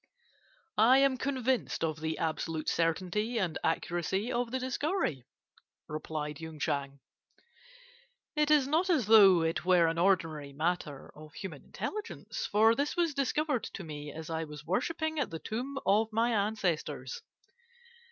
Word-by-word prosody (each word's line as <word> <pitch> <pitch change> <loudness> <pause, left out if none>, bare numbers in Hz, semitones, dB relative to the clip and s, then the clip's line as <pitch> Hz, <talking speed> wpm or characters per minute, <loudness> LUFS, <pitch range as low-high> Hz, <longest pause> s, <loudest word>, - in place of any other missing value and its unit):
"'I 250 +4 +7
am 270 -1 +4
convinced 260 -6 -1
of 160 -1 -1
the 160 0 -2
absolute 160 0 -2
certainty 185 +8 0
and 180 -7 -1
accuracy 175 +6 -1
of 240 0 0
the 260 - -1
discovery,' 260 - -2 0.6
replied 150 -1 -4
Yung 160 -1 -7
Chang. 140 -1 -2 1.4
'It 300 0 +2
is 295 -3 +5
not 325 +6 +1
as 305 - +3
though 195 -5 +7
it 160 -1 -1
were 180 -1 +5
an 165 0 0
ordinary 165 -6 +1
matter 155 -2 -2
of 155 0 -13
human 165 -8 -7
intelligence, 425 +2 -5
for 220 +2 +5
this 285 +7 -1
was 335 -3 +2
discovered 275 -1 0
to 195 - -7
me 150 -2 -7
as 160 +1 -8
I 160 0 -1
was 150 -1 -9
worshipping 315 - -1
at 285 - 0
the 165 - -5
tomb 250 +10 -4
of 210 +3 +3
my 230 +2 +2
ancestors. 210 - -1
190 Hz, 145 wpm, -31 LUFS, 160-260 Hz, 1.4 s, I